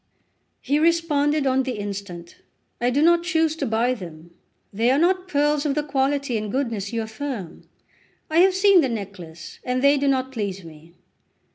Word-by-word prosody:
He 285 +3 0
responded 305 -3 +2
on 265 0 +2
the 260 -1 -3
instant: 200 -5 -7 0.4
"I 245 - +2
do 280 +4 +1
not 340 +1 +5
choose 325 -3 +1
to - - -2
buy 230 +3 +1
them; 170 -6 -10 0.4
they 225 +4 +1
are 265 - +3
not 365 +3 +1
pearls 295 -2 +1
of 290 -3 -1
the 300 - 0
quality 275 -2 0
and 210 -1 -4
goodness 230 -7 -2
you 230 -1 -2
affirm; 220 - -7 0.6
I 315 +2 +2
have 375 +1 +5
seen 385 -1 +5
the 270 - 0
necklace, 185 -7 -8
and 255 0 -1
they 280 +1 +5
do 280 - 0
not 265 -1 0
please 200 -6 -4
me." 165 +1 -15
265 Hz, 175 wpm, -23 LUFS, 205-295 Hz, 0.6 s, not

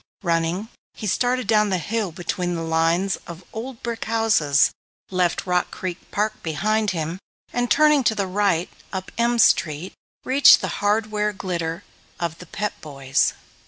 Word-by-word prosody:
Running, 170 +4 0 0.3
he 220 - -7
started 250 +4 +1
down 210 -1 +3
the 190 - +1
hill 205 +3 -2
between 175 +1 -3
the 165 - -3
lines 165 +4 +1
of 170 +1 -9
old 230 +2 -7
brick 235 -1 -4
houses, 215 -11 +3 0.4
left 180 -2 0
Rock 180 -1 +1
Creek 185 -1 -5
Park 210 +1 -1
behind 210 +7 0
him, 165 0 -3 0.3
and 245 0 0
turning 300 -2 +5
to 220 - +3
the 200 - 0
right 185 -2 0 0.2
up 190 -1 -5
M 235 +1 +2
Street, 170 -5 +2 0.3
reached 275 +2 +7
the - - -3
hardware 210 0 +1
glitter 170 -4 -3 0.4
of 170 -1 -3
The 180 - -11
Pep 210 +5 -4
Boys'. 135 -3 0
190 Hz, 155 wpm, -23 LUFS, 170-220 Hz, 0.4 s, reached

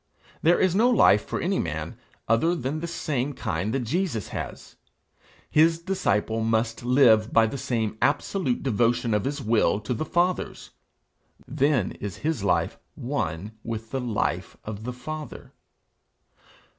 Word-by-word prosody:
There 170 +2 +4
is 185 -2 +3
no 225 +6 +4
life 105 - +5
for - - -4
any - - 0
man, - - -3 0.3
other 140 +10 +3
than 140 +1 -3
the 170 - -4
same 145 -5 -2
kind 105 -6 -2
that 135 +2 0
Jesus 130 - -2
has; - - -7 0.7
his 165 +2 +4
disciple 115 - 0
must 115 +1 0
live 120 -4 +5
by 115 - +5
the 120 +5 -4
same 115 -5 -2
absolute 145 -1 0
devotion 120 -1 +1
of 105 -1 +1
his 140 +1 -3
will 110 -2 +2
to 105 +4 -2
the 125 - -2
Father's; 175 +3 -1 0.8
then 140 -6 +1
is 100 -3 -5
his 155 -10 0
life 100 - +1 0.2
one 105 - -3
with 115 -1 -5
the 135 - -2
life 115 -4 -2
of 110 0 -6
the 125 - -3
Father. 155 +5 -8
125 Hz, 145 wpm, -25 LUFS, 110-155 Hz, 0.8 s, life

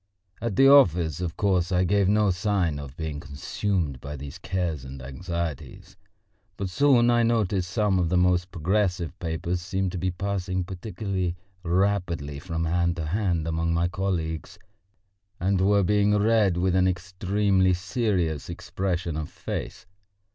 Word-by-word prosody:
At 115 -3 -2
the 135 - +6
office, 90 - +5
of 85 -3 -4
course, 95 -3 +1
I 90 0 +3
gave 100 +1 +2
no 105 -1 +3
sign 90 -5 0
of 70 0 -9
being 80 -3 -4
consumed 75 0 -3
by 70 +1 -6
these 70 0 -8
cares 85 -7 -2
and 65 +1 -8
anxieties. 85 +3 -5 0.6
But 95 -2 -3
soon 125 -1 +4
I 120 0 +4
noticed 105 -6 +1
some 100 -1 +1
of 85 -2 +1
the 90 - +2
most 90 0 +2
progressive 90 -1 0
papers 85 +1 -2
seemed 95 0 -2
to 90 - -4
be 95 +2 0
passing 95 0 -2
particularly 95 -1 -3 0.3
rapidly 90 -5 0
from 80 0 -3
hand 85 +1 +1
to 80 -2 -4
hand 85 -2 0
among 80 +1 0
my 85 +1 +2
colleagues, 85 -4 -3 0.8
and 95 +1 +1
were 100 +1 +4
being 105 +2 +3
read 105 -4 +3
with 90 +1 +1
an 95 0 +4
extremely 95 +1 +1
serious 90 - -1
expression 85 -4 -3
of 80 -1 -4
face. - - -6
90 Hz, 150 wpm, -26 LUFS, 85-100 Hz, 0.8 s, the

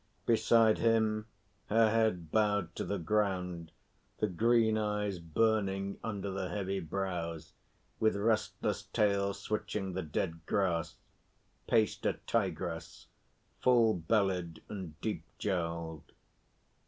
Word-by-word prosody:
Beside 115 -1 +4
him, 110 -1 +2 0.4
her 110 0 +4
head 110 -8 +1
bowed 105 -5 +2
to - - -2
the 100 +3 -2
ground, 90 -3 -1 0.5
the - - +1
green 110 +3 +3
eyes 105 -3 -1
burning 100 +2 0
under 100 -3 -3
the 95 -1 -3
heavy 95 +1 -2
brows, 85 -3 -4 0.5
with 110 -1 +3
restless 110 +2 0
tail 100 -1 +1
switching 100 -1 -3
the 95 - -2
dead 80 +1 -3
grass, 90 -5 0 0.7
paced 110 -2 +2
a - - +2
Tigress, 85 -2 -2 0.5
full 120 -3 +5
bellied 90 -2 0
and 90 -7 -7
deep - - -2
jowled. 85 -5 -3
100 Hz, 110 wpm, -32 LUFS, 85-110 Hz, 0.7 s, full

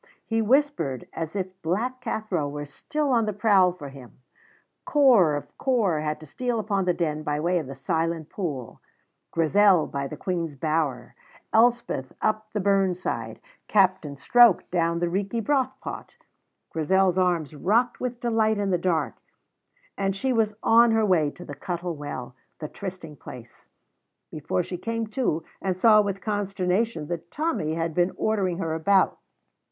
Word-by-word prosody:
He 225 0 0
whispered, 220 - +1
as 165 +2 -5
if 190 -1 -5
Black 235 +10 -2
Cathro 215 - -2
were 145 0 -5
still 290 - -3
on 230 -3 +2
the 210 - -1
prowl 200 -3 +4
for 160 -6 -9
him. 135 -3 -13 0.7
Corp 205 - +4
of - - -39
Corp 215 - +1
had 150 0 -2
to - - -10
steal 245 - -2
upon 200 -3 -1
the 180 - +2
Den 155 -3 -1
by 150 -1 -2
way 175 +3 +1
of 155 - -6
the 135 - -7
Silent 165 +3 -2
Pool, 145 - -5 0.5
Grizel 180 +1 +4
by 140 0 -4
the - - -8
Queen's 170 -5 -3
Bower, 145 -4 -1 0.4
Elspeth 230 - +2
up 215 0 -1
the 210 - -2
burn 195 -2 +2
side, 180 - -4 0.3
Captain 185 -8 +2
Stroke 240 - +5
down 170 -1 +1
the 175 - 0
Reekie 195 +6 -2
Brothpot. 265 - -2 0.6
Grizel's 185 +3 +2
arms 175 -5 +1
rocked 220 - +1
with 245 -1 -4
delight 225 -2 +1
in 200 -1 -1
the 180 - +1
dark, 170 -2 -1 0.8
and 195 -1 0
she 260 +6 0
was 220 -3 +1
on 235 +1 +6
her 220 -1 +3
way 165 -7 +3
to 175 +4 -12
the 145 - -7
Cuttle 175 +2 -4
Well, 145 -4 -6 0.2
the 155 - -5
trysting 180 -4 -8
place, 120 -2 -12 0.6
before 155 +4 -2
she 180 - -6
came 230 +3 -2
to 215 - -1 0.2
and 190 -2 -1
saw 215 +1 +6
with 200 -1 -3
consternation 200 -3 -1
that 170 0 -5
Tommy 295 - -1
had 165 0 -2
been 175 +3 +2
ordering 195 -5 0
her 165 -4 -2
about. 190 +5 +2
185 Hz, 160 wpm, -25 LUFS, 160-215 Hz, 0.8 s, on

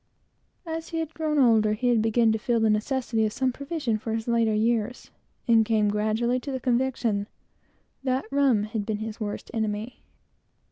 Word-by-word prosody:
As 325 0 -5
he 325 -1 -1
grew 310 -1 -2
older, 215 -2 +3
he 245 +2 +1
began 225 +1 +3
to 220 - 0
feel 235 0 +1
the 220 -1 +3
necessity 225 +1 0
of 215 - +1
some 260 +3 0
provision 275 -4 -3
for 225 +1 -3
his 225 +1 -4
later 230 -2 +2
years, 230 +2 -1 0.4
and 230 -2 +5
came 215 -2 +2
gradually 220 +4 0
to 275 - -6
the 260 - -3
conviction 240 -4 0 0.8
that 260 0 0
rum 275 -7 +3
had 215 0 -3
been 215 0 -2
his 220 +1 -6
worst 205 -2 -5
enemy. 220 +1 -3
230 Hz, 170 wpm, -26 LUFS, 215-255 Hz, 0.8 s, and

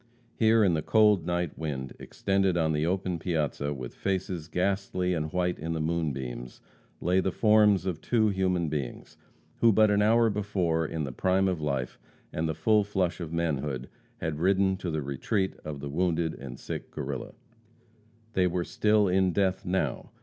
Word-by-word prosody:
Here, 110 0 +4
in 95 -4 +3
the 80 - 0
cold 105 -2 +4
night 85 -2 -2
wind, 70 -5 -4
extended 95 -2 0
on 80 -2 +2
the 75 +2 0
open 90 -1 -1
piazza, 75 -4 -1
with 65 -4 -6
faces 95 -4 -3
ghastly 90 0 0
and 80 -2 -2
white 90 0 0
in 80 +2 -3
the 80 - -2
moonbeams, 70 -7 -3 0.4
lay 90 +2 +2
the 95 0 0
forms 105 -3 +4
of 85 -4 -3
two 110 -3 +2
human 90 -3 0
beings, 75 -5 -5 0.4
who 115 - +5
but 110 0 +4
an 105 0 +3
hour 115 +1 +4
before, 95 -6 0
in 80 -1 -3
the 70 - -4
prime 95 +8 +1
of 90 -4 -1
life 70 -4 -2 0.3
and 80 +1 -1
the 80 - -2
full 105 +7 +3
flush 95 -4 -1
of 85 -3 -5
manhood, 75 -6 -2 0.3
had 80 -2 -3
ridden 95 +2 +3
to 90 -2 -4
the 80 -2 -2
retreat 95 - -1
of 75 -2 -6
the 70 - -5
wounded 85 0 0
and 65 -3 -9
sick - - -6
Guerrilla. 65 -1 -5 1.0
They 90 -1 +3
were 90 0 -1
still 105 +5 +2
in 95 0 +2
death 95 -1 0
now. 90 -8 -1
90 Hz, 175 wpm, -28 LUFS, 75-95 Hz, 1.0 s, who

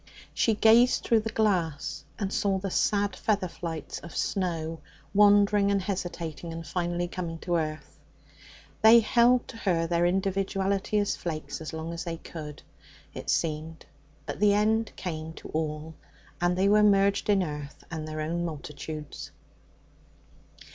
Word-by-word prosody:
She 225 - +2
gazed 230 +3 +5
through 230 - +3
the 220 +1 -3
glass, 165 -9 0
and 200 -2 -3
saw 200 -2 +1
the 190 0 -4
sad 205 +1 +1
feather 205 -4 0
flights 165 -3 -6
of 170 - -11
snow 165 -4 -2 0.3
wandering 205 0 +5
and 200 0 +2
hesitating, 175 -4 -4
and 165 0 -6
finally 175 +1 -2
coming 170 -2 -5
to 175 -1 0
earth. 155 -1 -5 0.8
They 230 +1 +8
held 240 +2 +4
to 180 -7 0
their 170 0 +2
individuality 195 +2 0
as 205 -1 +1
flakes 160 -2 -5
as 155 - -6
long 160 +1 -5
as 170 - -4
they 170 -2 -4
could, 155 -3 -9 0.5
it - - -7
seemed; 160 0 -1 0.4
but - - -5
the 205 0 +4
end 220 +1 +2
came 160 -3 -5
to - - -11
all, 155 0 -3 0.5
and 175 0 +2
they 190 +1 +3
were 210 +1 +5
merged 200 0 +3
in 200 -2 +4
earth 150 -3 -7
and 155 -1 -4
their 155 0 -4
own 170 +3 -2
multitudes. 150 -1 -6
175 Hz, 150 wpm, -28 LUFS, 160-205 Hz, 0.8 s, They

